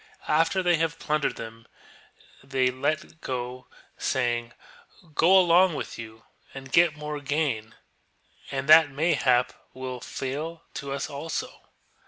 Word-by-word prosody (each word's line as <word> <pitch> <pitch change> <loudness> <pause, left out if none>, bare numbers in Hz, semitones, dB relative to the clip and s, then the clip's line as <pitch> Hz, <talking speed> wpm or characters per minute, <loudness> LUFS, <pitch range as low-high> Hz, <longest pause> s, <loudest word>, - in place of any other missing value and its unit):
After 165 +5 +2
they 175 -1 +3
have 165 0 -1
plundered 150 -2 -1
them 115 0 -9 0.8
they 130 -2 +1
let 140 +4 0
them 160 - -18
go, 125 0 -5 0.3
saying: 120 -2 -1 0.3
" 165 -4 -25
Go 180 +6 +5
along 180 -1 +5
with - - -6
you 110 0 -10 0.3
and 135 0 -9
get 170 -3 +4
more 150 0 -5
gain, 135 -7 -2 0.7
and 135 0 -3
that 155 0 +8
mayhap 135 -4 +2 0.2
will 130 -1 -5
fall 150 +7 -5
to 140 -1 -6
us 140 0 -2
also 145 +2 -6
140 Hz, 135 wpm, -26 LUFS, 125-160 Hz, 0.8 s, that